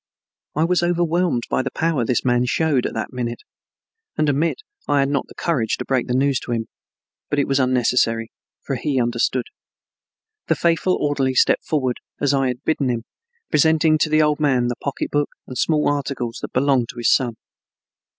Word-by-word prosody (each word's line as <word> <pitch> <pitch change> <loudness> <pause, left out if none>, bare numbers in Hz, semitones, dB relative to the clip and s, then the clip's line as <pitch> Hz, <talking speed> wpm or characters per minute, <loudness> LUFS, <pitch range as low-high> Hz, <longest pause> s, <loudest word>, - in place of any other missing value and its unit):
I 155 - +2
was 180 +1 +2
overwhelmed 175 -5 +1
by - - 0
the 135 - -3
power 160 -6 0
this 120 +3 0
man 125 0 +2
showed 145 -1 +1
at - - -7
that 110 - -4
minute, 120 -2 -4 0.7
and 155 - +2
admit 155 - 0 0.2
I 145 - +2
had 135 - +1
not 140 -2 -1
the - - -15
courage 125 -10 0
to - - -5
break 130 -3 0
the 125 - 0
news 135 -1 +2
to 120 - -4
him, 115 -1 -3 0.6
but 145 - -1
it 140 - +2
was 135 0 +1
unnecessary, 125 -3 +1 0.3
for - - -2
he 140 -3 -1
understood. 120 +1 0 1.0
The - - +2
faithful 170 +2 +1
orderly 135 -3 0
stepped - - +3
forward, 130 -5 0 0.2
as 145 -1 +2
I 135 -1 +2
had 125 +1 -4
bidden 145 -4 0
him, 115 -2 -1 0.5
presenting 155 +1 +4
to 155 - +2
the 155 0 +4
old 150 0 +1
man 130 -5 +2
the 120 - -2
pocketbook 145 +1 -1 0.2
and 130 - -9
small 150 +3 +1
articles 135 -5 -2
that - - -6
belonged 130 -2 +2
to 125 - -9
his 120 - +3
son. 120 -3 +1
135 Hz, 190 wpm, -21 LUFS, 125-150 Hz, 1.0 s, presenting